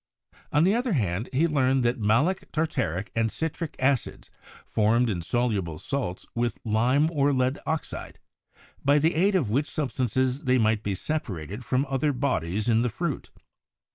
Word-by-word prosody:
On 150 Hz, +2 st, +4 dB
the 190 Hz, +3 st, +4 dB
other 240 Hz, -1 st, 0 dB
hand, 105 Hz, -, -1 dB
he 145 Hz, +6 st, +2 dB
learned 135 Hz, -4 st, +2 dB
that 120 Hz, +1 st, +1 dB
malic, 120 Hz, -, +1 dB
tartaric 105 Hz, -, -1 dB
and 115 Hz, -1 st, +1 dB
citric 160 Hz, 0 st, -3 dB
acids 135 Hz, -1 st, -1 dB, 0.3 s
formed 115 Hz, +2 st, +2 dB
insoluble 95 Hz, -3 st, -1 dB
salts 125 Hz, -, -3 dB
with 120 Hz, 0 st, -1 dB
lime 120 Hz, +7 st, +3 dB
or 145 Hz, -3 st, +2 dB
lead 130 Hz, +1 st, +1 dB
oxide, 160 Hz, -1 st, -4 dB, 0.7 s
by 140 Hz, +1 st, +4 dB
the 160 Hz, +3 st, +3 dB
aid 190 Hz, +5 st, +2 dB
of 135 Hz, -, +1 dB
which 140 Hz, +6 st, +1 dB
substances 130 Hz, 0 st, -1 dB
they 130 Hz, 0 st, +4 dB
might 110 Hz, -2 st, +2 dB
be 100 Hz, -2 st, -2 dB
separated 105 Hz, -, -4 dB
from 130 Hz, +3 st, +1 dB
other 135 Hz, +2 st, 0 dB
bodies 110 Hz, -, -1 dB
in 115 Hz, -1 st, +4 dB
the 125 Hz, -, +1 dB
fruit. 150 Hz, +4 st, -3 dB
130 Hz, 155 wpm, -26 LUFS, 110-145 Hz, 0.7 s, On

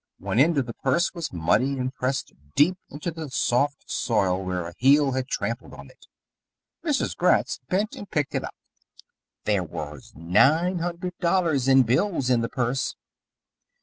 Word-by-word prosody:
One 115 Hz, -, -1 dB
end 160 Hz, +3 st, +4 dB
of 135 Hz, -, +2 dB
the 115 Hz, -, -6 dB
purse 135 Hz, +10 st, 0 dB
was 170 Hz, -4 st, -5 dB
muddy 110 Hz, +11 st, +1 dB
and 130 Hz, 0 st, -2 dB
pressed 130 Hz, +1 st, -2 dB, 0.2 s
deep 170 Hz, +6 st, +4 dB
into 150 Hz, +4 st, -5 dB
the 160 Hz, -2 st, -7 dB
soft 140 Hz, +2 st, 0 dB
soil 95 Hz, -5 st, 0 dB
where 90 Hz, -2 st, -3 dB
a 85 Hz, -, -9 dB
heel 140 Hz, +2 st, +5 dB
had 130 Hz, 0 st, -2 dB
tramped -, -, -2 dB
on -, -, -12 dB
it. -, -, -22 dB, 0.8 s
Mrs. 300 Hz, -5 st, 0 dB
Gratz -, -, +2 dB
bent 205 Hz, +4 st, 0 dB
and 205 Hz, -, -9 dB
picked 150 Hz, -3 st, -1 dB
it -, -, -1 dB
up. -, -, -7 dB, 0.9 s
There 105 Hz, -3 st, +1 dB
was 75 Hz, -4 st, -8 dB
nine 135 Hz, -, +3 dB
hundred 175 Hz, +1 st, -4 dB
dollars 170 Hz, -7 st, +1 dB
in 135 Hz, -1 st, +6 dB
bills 130 Hz, -, +1 dB
in 120 Hz, -2 st, +3 dB
the 115 Hz, -, -2 dB
purse. 125 Hz, +2 st, -1 dB
135 Hz, 165 wpm, -25 LUFS, 115-170 Hz, 0.9 s, in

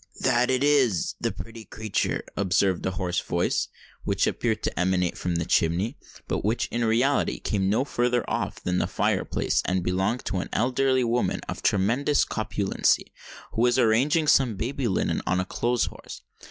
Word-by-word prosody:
"That 125 Hz, +1 st, +2 dB
it 130 Hz, +1 st, +1 dB
is—the 135 Hz, -, +2 dB
pretty 115 Hz, 0 st, -9 dB
creatur!" 110 Hz, -1 st, -2 dB
observed 95 Hz, -1 st, +1 dB
a 95 Hz, -, -3 dB
hoarse 90 Hz, -2 st, -1 dB
voice, 85 Hz, +1 st, 0 dB, 0.4 s
which -, -, +1 dB
appeared 110 Hz, -2 st, -1 dB
to -, -, -2 dB
emanate 90 Hz, -1 st, +1 dB
from 90 Hz, -1 st, -2 dB
the 85 Hz, -1 st, -1 dB
chimney, 90 Hz, -, +1 dB, 0.3 s
but -, -, -2 dB
which 110 Hz, +4 st, 0 dB
in 120 Hz, 0 st, -1 dB
reality 120 Hz, +5 st, +1 dB
came 105 Hz, -3 st, -1 dB
from 95 Hz, -, +1 dB
no 115 Hz, +7 st, +1 dB
further 120 Hz, -3 st, 0 dB
off -, -, -2 dB
than 90 Hz, 0 st, 0 dB
the -, -, 0 dB
fire -, -, 0 dB
place, -, -, 0 dB
and 90 Hz, -1 st, 0 dB
belonged 95 Hz, +7 st, -1 dB
to 95 Hz, -, -2 dB
an -, -, -5 dB
elderly 130 Hz, +1 st, +2 dB
woman 120 Hz, +1 st, 0 dB
of -, -, -5 dB
tremendous 120 Hz, +9 st, +2 dB
corpulency, 105 Hz, -3 st, 0 dB, 0.4 s
who 115 Hz, -, -2 dB
was 120 Hz, 0 st, +3 dB
arranging 130 Hz, +7 st, +3 dB
some 130 Hz, -6 st, +4 dB
baby 125 Hz, +5 st, -2 dB
linen 95 Hz, -, 0 dB
on 90 Hz, -, +1 dB
a 95 Hz, -, -1 dB
clothes 120 Hz, +5 st, 0 dB
horse. -, -, -10 dB
110 Hz, 175 wpm, -26 LUFS, 95-125 Hz, 0.4 s, some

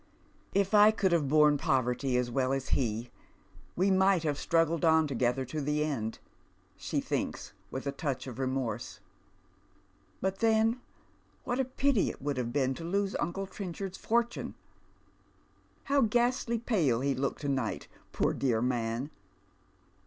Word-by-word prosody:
" -, -, -31 dB
If 195 Hz, +2 st, -4 dB
I 210 Hz, 0 st, +8 dB
could 200 Hz, -4 st, +1 dB
have 165 Hz, -5 st, +2 dB
borne 150 Hz, 0 st, +4 dB
poverty 130 Hz, 0 st, +1 dB
as 125 Hz, -1 st, -1 dB
well 130 Hz, +1 st, +1 dB
as 135 Hz, -1 st, -3 dB
he, 120 Hz, -1 st, -1 dB, 0.6 s
we 190 Hz, +3 st, +2 dB
might 190 Hz, -2 st, +3 dB
have 145 Hz, -3 st, -1 dB
Bi.ruggled 165 Hz, 0 st, +3 dB
on 160 Hz, -1 st, +5 dB
together 130 Hz, -2 st, 0 dB
to 150 Hz, +5 st, -4 dB
the 150 Hz, +1 st, 0 dB
end," 115 Hz, -8 st, -2 dB, 0.6 s
she -, -, -2 dB
thinks, -, -, -3 dB, 0.2 s
with 130 Hz, -, -5 dB
a 140 Hz, -, -1 dB
touch 140 Hz, -2 st, -3 dB
of 130 Hz, -2 st, -8 dB
remorse. 130 Hz, -2 st, -3 dB, 0.6 s
" -, -, -36 dB
But 190 Hz, 0 st, -2 dB
then 225 Hz, +2 st, +2 dB, 0.6 s
what 245 Hz, 0 st, -2 dB
a 265 Hz, -, +2 dB
pity 260 Hz, -3 st, +1 dB
it -, -, -8 dB
would 140 Hz, 0 st, -2 dB
have 120 Hz, -2 st, -2 dB
been 135 Hz, -1 st, +1 dB
to 165 Hz, -, -8 dB
lose 195 Hz, +3 st, -1 dB
uncle 195 Hz, +3 st, -2 dB
'i'i 195 Hz, -, -11 dB
enchard's 190 Hz, +1 st, -5 dB
fortune! 235 Hz, +1 st, -1 dB, 1.3 s
How 280 Hz, 0 st, +2 dB
ghastly 240 Hz, +1 st, +1 dB
pale 170 Hz, -, +1 dB
he 140 Hz, 0 st, +1 dB
looked 135 Hz, +1 st, -2 dB
to 145 Hz, -, -3 dB
night, 130 Hz, -5 st, -2 dB, 0.2 s
poor -, -, +1 dB
(ioar 120 Hz, -4 st, 0 dB
man 120 Hz, +2 st, -2 dB
150 Hz, 160 wpm, -30 LUFS, 130-195 Hz, 1.3 s, I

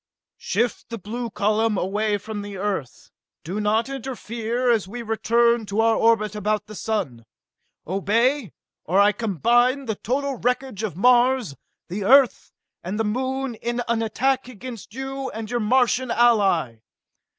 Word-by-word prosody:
"Shift 240 Hz, +1 st, -1 dB
the 230 Hz, -, -5 dB
blue 230 Hz, +4 st, -5 dB
column 210 Hz, +1 st, +1 dB
away 205 Hz, +3 st, 0 dB
from 210 Hz, +1 st, -6 dB
the 205 Hz, -1 st, -7 dB
Earth! 190 Hz, -9 st, -4 dB, 0.3 s
Do 185 Hz, +6 st, -4 dB
not 215 Hz, +3 st, +1 dB
interfere 245 Hz, -2 st, -2 dB
as 220 Hz, -5 st, +1 dB
we 235 Hz, +4 st, -6 dB
return 230 Hz, 0 st, +2 dB
to 200 Hz, +2 st, -2 dB
our 225 Hz, 0 st, +4 dB
orbit 225 Hz, -3 st, +2 dB
about 210 Hz, 0 st, -1 dB
the 215 Hz, -, -11 dB
sun! 195 Hz, -, -3 dB, 0.6 s
Obey, 220 Hz, -, +1 dB, 0.3 s
or 185 Hz, +5 st, +1 dB
I 205 Hz, +1 st, +6 dB
combine 240 Hz, -, +1 dB
the 220 Hz, -, -1 dB
total 270 Hz, +5 st, -2 dB
knowledge 250 Hz, -3 st, -1 dB
of 205 Hz, -7 st, -4 dB
Mars, 245 Hz, -, +3 dB, 0.3 s
the 195 Hz, +3 st, -4 dB
Earth, 265 Hz, +4 st, +4 dB, 0.3 s
and 190 Hz, +5 st, -4 dB
the -, -, +2 dB
Moon 260 Hz, +3 st, -2 dB
in 240 Hz, +2 st, -3 dB
an 230 Hz, -1 st, +1 dB
attack 255 Hz, +4 st, 0 dB
against 235 Hz, -2 st, -9 dB
you 270 Hz, 0 st, -4 dB
and 220 Hz, 0 st, -7 dB
your 240 Hz, -, 0 dB
Martian 245 Hz, +2 st, +2 dB
ally! 200 Hz, -, +3 dB
225 Hz, 150 wpm, -23 LUFS, 205-245 Hz, 0.6 s, I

